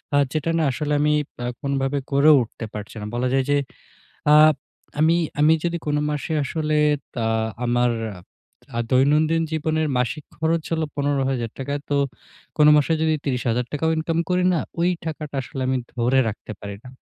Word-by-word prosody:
আ - - +5 0.2
যেটা 155 +2 0
না 160 - +2
আসলে 150 +2 -2
আমি 150 0 +3 0.3
আ - - -2 0.2
কোনোভাবে 140 0 -1
করেও 145 +2 +6
উঠতে 115 0 -8
পারছি 105 +1 -7
না। - - -5
বলা 125 +1 0
যায় 135 -1 +3
যে, 145 - +4 0.8
আপ 155 0 +7 0.5
আমি, 165 +2 +4 0.2
আমি 155 +2 +6
যদি 170 0 0
কোন 150 0 +1
মাসে 150 +2 -3
আসলে 155 +2 -1 0.5
আ - - +1 0.4
আমার 120 0 +2 0.8
আ - - 0
দৈনন্দিন 150 +5 +3
জীবনের 155 0 0
মাসিক 140 +4 -2
খরচ 160 +1 0
হলো 160 -1 +1
১৫,০০০ 135 -5 0
টাকা। 140 +2 -3
তো, 145 - +1 0.6
কোনো 150 -1 +6
মাসে 150 +2 +2
যদি 160 -1 +2
৩০,০০০ 125 -3 0
টাকাও 160 +2 0
ইনকামও 165 +1 0
করি 180 0 +2
না, - - +1 0.2
ওই 175 - +3 0.2
টাকাটা 150 -3 -5
আসলে 130 +1 -6
আমি 130 - +1 0.2
ধরে 125 +2 +2
রাখতে 110 0 -7
পারি 100 -1 -6
না। - - -10
145 Hz, 170 wpm, -23 LUFS, 130-160 Hz, 0.8 s, আপ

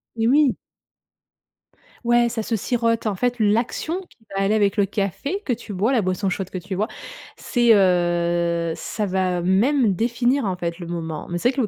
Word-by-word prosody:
Et 225 0 +1
oui. 280 +1 +4 1.5
Ouais 240 0 +4
ça 230 -1 -3
se 225 0 -1
sirote, 230 +1 0
en 205 - -1
fait. 245 +6 0
L'action 235 - 0
qui - - -24 0.2
va 195 - +1
aller 200 +2 +2
avec 200 -2 +2
le 205 -2 +3
café 200 - -3
que 250 - +1
tu 230 -2 -8
bois, 210 +8 +1
la 240 - +3
boisson 185 +1 -1
chaude 190 0 -3
que - - -5
tu 190 +2 -5
bois, 210 +4 -1 0.5
c'est, 240 -3 +3
heu, 175 -3 +2
ça 215 - -3
va 185 -2 0
même 215 +6 +3
définir 240 +6 +1
en 190 -3 -2
fait 170 0 -4
le 175 - -7
moment. 165 -3 -5
Mais 175 - -2
c'est 175 - +1
vrai - - -12
que 270 - +1
le 225 - 0
205 Hz, 200 wpm, -22 LUFS, 180-235 Hz, 1.5 s, oui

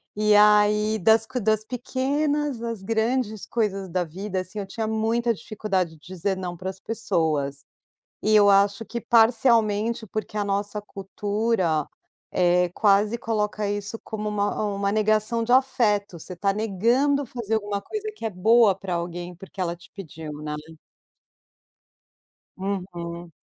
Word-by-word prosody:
e 210 0 +3
aí 210 +1 +5
das 220 +4 +4 0.2
das 215 +1 +1
pequenas 275 +2 -1
às 230 -4 -4
grandes 220 0 -1
coisas 195 -5 -1
da 180 +1 0
vida, 185 +3 -4
assim, 185 +4 -6
eu 195 - -5
tinha 220 +2 -3
muita 225 +2 +1
dificuldade 195 -4 -2
de 160 - -15
dizer 185 +3 -3
não 180 -2 -4
pras 190 +2 -6
pessoas. 155 -10 -1 0.6
E 215 - +3
eu 205 -1 +6
acho 200 +2 +4
que 235 +1 -5
parcialmente 225 -1 +3
porque 215 +1 -5
a 205 - 0
nossa 200 +1 -2
cultura, 200 -4 -1 0.4
eh, 180 0 +3
quase 210 +2 +3
coloca 210 -2 -1
isso 205 +2 -3
como 215 -1 -4
uma 205 0 -1
uma 200 0 0
negação 215 +2 +1
de 245 - 0
afeto, 210 -8 +2
você 175 - -9
está 195 +3 0
negando 235 +8 +1
fazer 230 -3 -3
alguma 205 -2 -2
coisa 430 - -5
que - - -9
é 225 - 0
boa 215 +3 +4
pra 185 -2 -4
alguém 175 +1 -4
porque 195 +1 -11
ela 170 -1 -1
te 175 - -18
pediu, 160 -5 -8
né. 150 0 -4 2.0
Uhum. 175 -3 -5
210 Hz, 145 wpm, -24 LUFS, 190-225 Hz, 2.0 s, eu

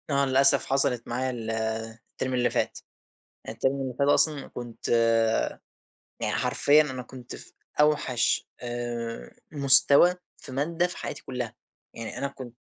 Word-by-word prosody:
آه 140 -1 +2
للأسف 135 +1 +4
حصلت 125 -3 +1
معايا 130 +2 -2
ال 115 -3 -5 0.6
التيرم 130 0 -4
اللي 125 -1 +2
فات، - - -2 0.7
التيرم 115 +5 0
اللي 130 -1 -4
فات 140 - +2
أصلًا 145 0 +2
كنت 120 -2 -8 1.3
يعني - - -1
حرفيًا 150 +2 +3
أنا 130 -4 -5
كنت 125 -1 -10
في - - -12 0.3
أوحش 145 -6 +2
آآ، 120 -1 -5 0.2
مستوى 140 +4 +6 0.2
في 135 - -12
مادة 165 +6 0
في 180 - -8
حياتي - - -6
كلها، 125 -3 -5 0.4
يعني 115 -1 -7
أنا 140 - -2
كنت 130 -3 -11
130 Hz, 135 wpm, -26 LUFS, 120-140 Hz, 1.3 s, مستوى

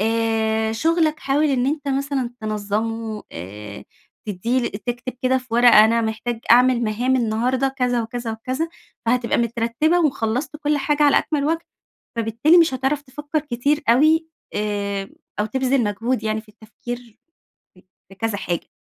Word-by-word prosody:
آآ 220 0 +1
شُغلك 315 +5 +1
حاول 280 +3 +1
إن 260 -3 +1
أنت 290 0 -2
مثلًا 275 -2 -1
تنظَمُه 215 +1 -3
آآ 100 +4 -8 0.4
تدّي 230 +6 0
ل - - -1
تكتب 240 +4 -4
كده 260 0 +3
في 255 - -13
ورقة 235 -3 +8
أنا 230 +1 +3
محتاج 225 +1 -3
أعمل 250 +1 +6
مهام 240 +4 +1
النهاردة 250 +3 +1
كذا 250 -3 0
وكذا 230 0 -4
وكذا، 255 +8 -3 0.4
فهتبقى 240 0 +1
مترتّبة، 235 +8 +1
وخلصت 260 -1 -1
كل 295 -1 0
حاجة 295 +1 +1
على 290 -1 +6
أكمل 295 -3 -1
وجه، 330 +3 -1 0.5
فبالتالي 230 +9 +3
مش 330 -5 +4
هتعرف 270 +3 0
تفكر 295 +3 -3
كتير 290 +1 0
اوي، 310 +7 +4 0.3
آآ 200 -1 -2 0.3
أو 210 - +2
تبذل 260 +2 +1
مجهود 220 +3 -1
يعني 215 0 -1
في 215 - -22
التفكير 235 +1 -9 0.6
ف - - -17 0.3
في 195 - -14
كذا 220 +1 -2
حاجة. 175 -3 -3
240 Hz, 150 wpm, -22 LUFS, 220-275 Hz, 0.6 s, ورقة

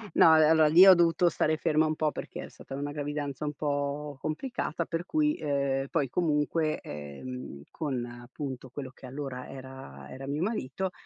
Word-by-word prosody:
No, 165 - +8
beh, 155 -1 +6
allora 160 -1 +5
lì 170 +5 +8
ho 190 - +11
dovuto 170 0 +4
stare 155 -1 +1
ferma 155 -1 +2
un 155 0 0
po' 155 -1 +1
perché - - -7
è - - -12
stata 135 - -9
una 145 +1 -3
gravidanza 145 -1 -4
un 150 - -2
po' 145 0 -2
complicata, 170 - -3
per 165 +2 -3
cui, 305 +5 +1
uhm, 140 -2 0
poi 145 -5 0
comunque, 155 0 +1
ehm, 75 - -8
con 135 -7 -3
appunto 125 +2 -7
quello 130 0 -7
che 130 - -14
allora 135 -1 -6
era 130 - -10
era 135 - -8
mio 145 +4 -1
marito, 190 - -2
145 Hz, 180 wpm, -29 LUFS, 130-160 Hz, -, ho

